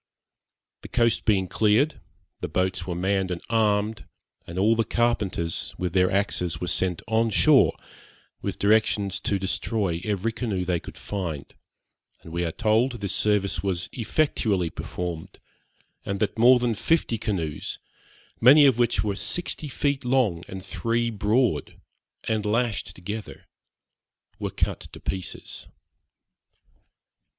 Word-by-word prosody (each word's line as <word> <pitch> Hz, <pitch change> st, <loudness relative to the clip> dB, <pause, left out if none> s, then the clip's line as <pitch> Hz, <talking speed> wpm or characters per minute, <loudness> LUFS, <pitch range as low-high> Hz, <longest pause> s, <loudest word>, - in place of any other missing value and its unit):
The -, -, -9 dB
coast 115 Hz, -1 st, +1 dB
being 95 Hz, -4 st, +2 dB
cleared, 110 Hz, -, +2 dB, 0.4 s
the -, -, -3 dB
boats 95 Hz, -1 st, -1 dB
were 90 Hz, -, -2 dB
manned 95 Hz, +1 st, 0 dB
and 90 Hz, -1 st, -3 dB
armed, 105 Hz, -1 st, +1 dB, 0.4 s
and 85 Hz, -, -7 dB
all 105 Hz, +4 st, +4 dB
the 115 Hz, -, +2 dB
carpenters 105 Hz, -9 st, -1 dB
with 90 Hz, -2 st, -2 dB
their 90 Hz, -1 st, +4 dB
axes 95 Hz, -3 st, -1 dB
were -, -, -3 dB
sent 90 Hz, 0 st, +1 dB
on 115 Hz, +1 st, +2 dB
shore, 140 Hz, +5 st, +5 dB, 0.7 s
with -, -, -3 dB
directions 100 Hz, -2 st, +2 dB
to 100 Hz, -, 0 dB
destroy 95 Hz, -2 st, -1 dB
every 105 Hz, +2 st, -1 dB
canoe 105 Hz, -6 st, -2 dB
they 90 Hz, -1 st, 0 dB
could -, -, -11 dB
find; 85 Hz, -8 st, -5 dB, 0.7 s
and 80 Hz, -, -11 dB
we 85 Hz, 0 st, -1 dB
are 85 Hz, -, -1 dB
told 115 Hz, +6 st, +2 dB
this 100 Hz, -5 st, -2 dB
service 105 Hz, -2 st, +1 dB
was 90 Hz, -3 st, -2 dB
effectually 110 Hz, -, 0 dB
performed, 85 Hz, -3 st, -5 dB, 0.7 s
and 100 Hz, 0 st, -3 dB
that 105 Hz, -, 0 dB
more 120 Hz, +3 st, +7 dB
than 120 Hz, -1 st, 0 dB
fifty 115 Hz, 0 st, +1 dB
canoes, 85 Hz, -9 st, -3 dB, 0.6 s
many 140 Hz, +5 st, +8 dB
of 130 Hz, -4 st, +4 dB
which 120 Hz, -1 st, +2 dB
were 105 Hz, -2 st, -1 dB
sixty 160 Hz, -, -3 dB
feet 140 Hz, 0 st, -1 dB
long, 120 Hz, -9 st, +2 dB
and 95 Hz, -1 st, -8 dB
three 115 Hz, 0 st, -1 dB
broad, 110 Hz, +3 st, 0 dB, 0.4 s
and 110 Hz, -1 st, -1 dB
lashed 110 Hz, 0 st, -1 dB
together, 105 Hz, +4 st, -7 dB, 0.9 s
were -, -, -2 dB
cut -, -, -1 dB
to -, -, -11 dB
pieces. 95 Hz, -1 st, -5 dB
105 Hz, 135 wpm, -25 LUFS, 95-115 Hz, 0.9 s, many